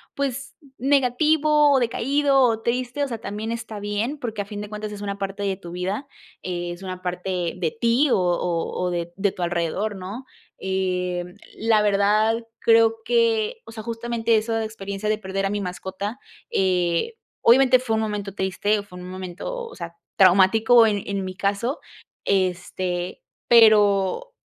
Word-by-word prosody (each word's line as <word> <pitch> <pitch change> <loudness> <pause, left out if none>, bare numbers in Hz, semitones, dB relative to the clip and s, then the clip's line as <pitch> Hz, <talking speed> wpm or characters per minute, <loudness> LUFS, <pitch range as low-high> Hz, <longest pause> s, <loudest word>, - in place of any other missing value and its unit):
pues 275 -1 -3 0.2
negativo 290 +3 +3
o 265 - +4
decaído 275 +4 +2
o 225 -3 +3
triste, 250 +4 -1
o - - 0
sea, 230 -3 -4
también 215 +2 -5
está 225 -2 -5
bien, 210 +8 -2
porque 225 -5 -4
a - - -5
fin 205 0 -7
de 210 - -7
cuentas 210 0 -5
es 205 - -8
una 200 -1 -4
parte 195 +1 -4
de 195 -2 -1
tu 175 -3 -10
vida, 190 +10 -3 0.3
eh, 175 -1 -4
es 175 +2 -9
una 185 -1 -6
parte 180 -1 -2
de 170 +2 -2
ti 245 +5 +3
o - - +4
o 175 -1 -1
o - - 0
de 170 -1 -3
de 200 0 +1
tu 180 - -5
alrededor, 175 +5 -1
¿no?, 195 +8 -7 0.3
eh, 180 -2 -1 0.3
la 220 -1 +3
verdad, 210 +3 +2
creo 225 0 +5
que, 460 -1 +1
o 225 - -11
sea, 220 -1 -7
justamente 230 -1 0
eso 225 +1 -1
de 225 - 0
experiencia 200 -1 -5
de 215 - +2
perder 195 -1 -3
a - - 0
mi 205 0 -2
mascota, 190 +4 -5 0.3
eh, 180 - +1 0.3
obviamente 255 +1 +6
fue 225 -3 -1
un - - 0
momento 205 -2 -3
triste, 205 +2 0
fue 180 -3 -13
un 180 0 -8
momento, 185 - -6
o - - -12
sea, 170 -1 -8 0.2
traumático, 215 +5 +6
eh, 205 -2 -1
en 200 -1 -2
mi 185 0 -6
caso, 205 - -1 0.4
este, 180 -1 -1 0.3
pero 215 - +5
205 Hz, 170 wpm, -23 LUFS, 185-235 Hz, 0.4 s, obviamente